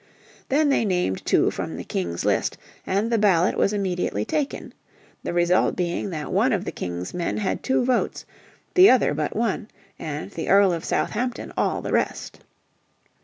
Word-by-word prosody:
Then 290 +2 +3
they 275 - +2
named 180 - 0
two - - +3
from - - -5
the - - -5
King's 85 -2 -3
list, - - +1 0.3
and 205 +5 0
the 230 - +2
ballot 185 -4 +3
was 195 - +2
immediately 180 - -1
taken; 295 -2 -3 0.5
the - - -4
result 175 +1 +2
being 180 +2 -2
that 155 -4 -5
one 225 +7 +3
of 200 -1 -1
the - - -3
King's 90 0 -5
men 175 -1 -2
had 205 -3 -1
two 260 -2 +1
votes, 255 -1 0 0.5
the 370 +1 +8
other 255 - +4
but 150 0 -2
one, 220 -2 -1 0.3
and 150 -2 -5
the 165 - -5
Earl 195 -1 +5
of 165 - -4
Southampton 245 +2 -2
all - - 0
the - - -4
rest. - - -1
190 Hz, 170 wpm, -24 LUFS, 165-230 Hz, 0.5 s, the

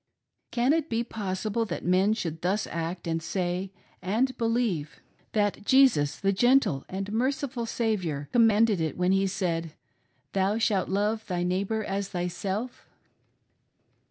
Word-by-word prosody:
Can 250 +4 +2
it 320 -1 0
be 230 0 0
pos 200 -5 -4
sible 225 +1 -1
that - - -5
men 185 +4 +3
should 165 -7 -4
thus 195 +4 0
act 170 +2 -4
and 165 -1 -1
say 180 +2 -2 0.2
— - - -34 0.2
and 260 +2 +2
believe 225 - -1 0.2
— - - -37
that 205 -1 0
Jesus, 240 - +4
the 195 0 +1
gentle 245 - +3
and 195 +2 -4
merciful 260 0 -1
Saviour, 185 -12 -1
commanded 225 -4 +4
it 160 -3 -2
when 180 +1 +2
He 195 0 +3
said: 170 -4 -2 0.6
"Thou 195 +2 +1
shalt 210 -5 +1
love 210 +3 0
thy 175 -2 -1
neighbor 195 +5 -1
as 195 0 -3
thyself 190 +6 -4
195 Hz, 150 wpm, -27 LUFS, 180-225 Hz, 0.6 s, Jesus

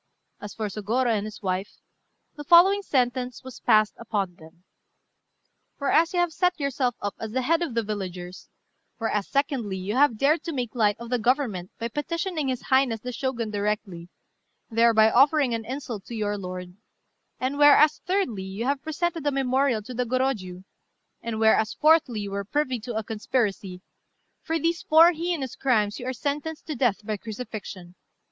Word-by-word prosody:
As 205 - -8
for 220 - -3
Sôgorô 220 +4 0
and 205 0 -2
his 215 0 -11
wife, 190 +1 -2 0.6
the 295 - -7
following 360 +5 +6
sentence 250 -6 -1
was 260 -1 -10
passed 215 -1 +3
upon 205 -5 -2
them: 160 +2 -17 1.1
"Whereas 315 +4 +2
you 355 - 0
have 350 -2 +1
set 360 0 +1
yourself 265 -4 -1
up 205 -1 -2
as 220 -1 -6
the 260 0 0
head 330 +5 +2
of 310 -9 -3
the 230 - +1
villagers; 185 -4 -6 0.5
whereas, 210 -3 -1
secondly, 265 -8 -1
you 190 +3 -4
have 270 -4 +4
dared 295 +7 +2
to 330 - -3
make 245 -5 -3
light 210 -4 +2
of 235 +1 -9
the 250 - +1
Government 225 -7 0
by 230 - -3
petitioning 320 - -3
his 255 -2 -2
Highness 260 -4 +2
the 250 - -5
Shogun 240 -3 -3
directly, 200 -4 -3 0.6
thereby 225 -1 +5
offering 275 0 +4
an 225 -1 -3
insult 250 -5 -5
to 235 - -7
your 205 -1 -1
lord; 180 -2 -7 0.6
and 265 +3 -2
whereas, 290 +1 +6
thirdly, 360 - -1
you 190 +4 -5
have 275 +1 0
presented 320 0 -2
a - - +3
memorial 265 -3 +1
to 250 - -8
the 250 +1 -1
Gorôjiu; 230 -8 -2 0.6
and, 230 -1 -4
whereas, 220 0 +3
fourthly, 305 -8 +3
you 200 -1 -5
were 200 0 -3
privy 260 +3 -1
to 235 +1 -6
a 220 - -1
conspiracy: 205 -4 -2 0.6
for 325 0 -1
these 335 +2 -1
four 325 +2 +6
heinous 330 -6 -3
crimes 215 -6 +1
you 250 - -6
are - - 0
sentenced 295 +4 -4
to 310 - -4
death 230 -5 0
by 215 -1 -2
crucifixion. 205 -5 -8
240 Hz, 175 wpm, -25 LUFS, 210-285 Hz, 1.1 s, following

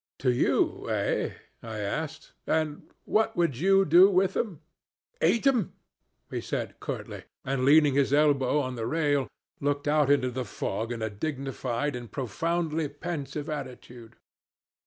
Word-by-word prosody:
'To 130 - +2
you, 120 - +1
eh?' - - 0 0.3
I 110 -1 -6
asked; 140 +10 -4 0.7
'what 220 -1 +1
would 170 -6 +2
you 195 +5 +4
do 180 +5 +7
with 190 0 +2
them?' 185 -10 -2 0.6
'Eat 235 - +3
'im!' 250 -9 +2 0.6
he - - -3
said - - -4
curtly, - - -6 0.2
and, 130 -1 0
leaning 145 0 +6
his 140 -1 +2
elbow 145 -1 +3
on 130 -2 -3
the 115 -2 -3
rail, 145 -3 +1 0.3
looked 145 0 -1
out 150 -1 +3
into 135 -3 +3
the 130 +1 -3
fog 115 0 -3
in 115 -2 -4
a 110 - -2
dignified 135 +1 -3
and 120 -2 -8
profoundly 160 +5 -1
pensive 150 -1 -5
attitude. 125 -5 -7
145 Hz, 140 wpm, -28 LUFS, 125-160 Hz, 0.7 s, do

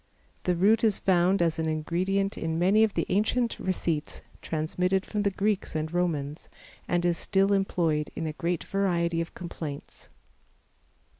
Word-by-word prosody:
The 180 - +2
root 210 +6 +3
is 215 -3 +4
found 180 0 +3
as 165 -1 0
an 160 - 0
ingredient 185 +6 0
in 160 0 -2
many 195 +6 +4
of 220 -2 +1
the - - 0
ancient 230 +5 +1
receipts 170 -4 -2 0.2
transmitted 180 +5 -1
from 210 - -2
the 200 - +2
Greeks 200 -1 -1
and 155 +1 -2
Romans, 155 -4 -2 0.4
and 175 0 +1
is 175 -1 +1
still 195 0 +2
employed 165 -6 +1
in - - -3
a 155 - -3
great 170 +2 -2
variety 170 -4 0
of 165 - -7
complaints. 160 -5 -7
175 Hz, 155 wpm, -27 LUFS, 165-195 Hz, 0.4 s, is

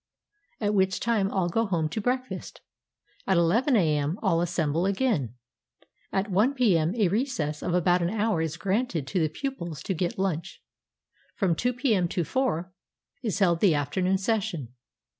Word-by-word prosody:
at 210 -1 0
which 190 -2 +2
time 215 -4 +1
all 190 -3 0
go 225 +6 0
home 170 -5 0
to 160 +8 -4
breakfast. 255 +3 -3 0.7
At 190 -2 +3
ii 225 - +3
a.m., 155 -2 +1
all 170 -5 +2
assemble 170 0 0
again. 195 - 0 0.8
At 195 0 -1
i 210 +5 +5
p.m., 185 - +2
a 215 -5 +3
recess 170 - -1
of 175 - -1
about 180 0 +3
an 170 - +1
hour 210 -4 0
is 160 0 -3
granted 195 - -1
to 185 +7 -1
the 160 -2 +1
pupils 170 - -5
to 190 - -1
get 175 0 -2
lunch. 185 -4 -2 0.8
From 190 -4 +1
2 245 +8 0
p.m. 225 -8 +1
to 175 +1 -1
4 180 - -1 0.5
is 220 -6 -2
held 175 -5 +3
the 180 -5 +4
afternoon 180 +7 0
session. 195 - -2
185 Hz, 160 wpm, -27 LUFS, 165-220 Hz, 0.8 s, i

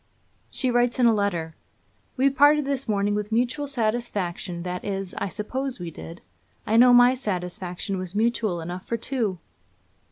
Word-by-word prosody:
She 255 -2 0
writes 245 0 +2
in 250 - +3
a 230 - +6
letter: 175 -6 -1 0.6
'We 270 +2 +3
parted 290 +2 +5
this 275 -3 -2
morning 205 0 +1
with 210 +1 -3
mutual 250 +6 0
satisfaction; 215 -8 -2
that 180 0 -4
is, 195 -2 -3
I - - -1
suppose 255 +6 -4
we 175 -1 -5
did; 165 +2 -10 0.4
I 220 - +1
know 245 +2 +7
my 245 +1 +7
satisfaction 185 -4 -4
was 185 +1 -6
mutual 215 -5 0
enough 175 +3 -7
for 230 - -1
two.' 225 -5 -2
215 Hz, 160 wpm, -25 LUFS, 185-245 Hz, 0.6 s, know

